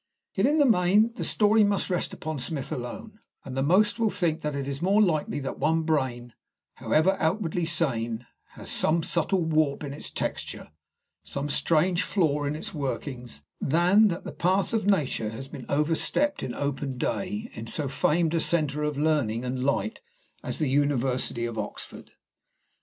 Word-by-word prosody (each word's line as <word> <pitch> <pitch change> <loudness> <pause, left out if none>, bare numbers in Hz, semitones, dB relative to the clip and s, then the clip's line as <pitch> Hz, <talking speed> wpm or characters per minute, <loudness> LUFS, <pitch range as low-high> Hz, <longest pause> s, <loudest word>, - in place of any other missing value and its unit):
Yet, - - +2
in 300 +2 +2
the 290 - +5
main, 210 +1 +4
the - - -5
story 215 +1 +4
must 200 -1 +1
rest 180 - 0
upon 155 -2 -5
Smith 135 +2 -3
alone, 210 - -6 0.3
and 130 -1 -6
the 135 - 0
most 200 - +3
will 225 -1 +3
think 170 -5 -1
that 150 -1 -2
it 140 -1 -3
is 140 0 -4
more 195 +4 +3
likely 160 -8 +1
that 135 - -5
one 160 +1 +2
brain, 130 -6 -1 0.4
however 175 +5 +2
outwardly 170 -1 0
sane, 120 -8 -1 0.3
has - - -7
some 165 +1 +2
subtle 175 +2 +1
warp 155 -3 +1
in 140 -1 -5
its 145 - -5
texture, - - -4 0.5
some 140 +1 -3
strange 170 +4 +2
flaw 150 -9 +1
in 145 +1 -1
its 155 - -6
workings, 130 - -5 0.2
than 180 +8 +4
that 175 -3 -3
the - - -7
path 190 +5 +1
of 215 -3 0
Nature 145 - +1
has 130 +5 -7
been 135 -3 -9
overstepped 165 - +1
in 120 - -4
open 140 -2 -3
day 205 - -3
in 110 +1 -7
so 145 +5 -1
famed 160 +4 +1
a 165 - +2
centre 150 -3 +1
of 150 -1 -1
learning 140 -7 +1
and 125 0 -2
light 140 - -1 0.4
as - - -4
the 155 - 0
University 130 -3 +1
of 115 -2 -4
Oxford. 105 - -7
155 Hz, 175 wpm, -27 LUFS, 135-185 Hz, 0.5 s, the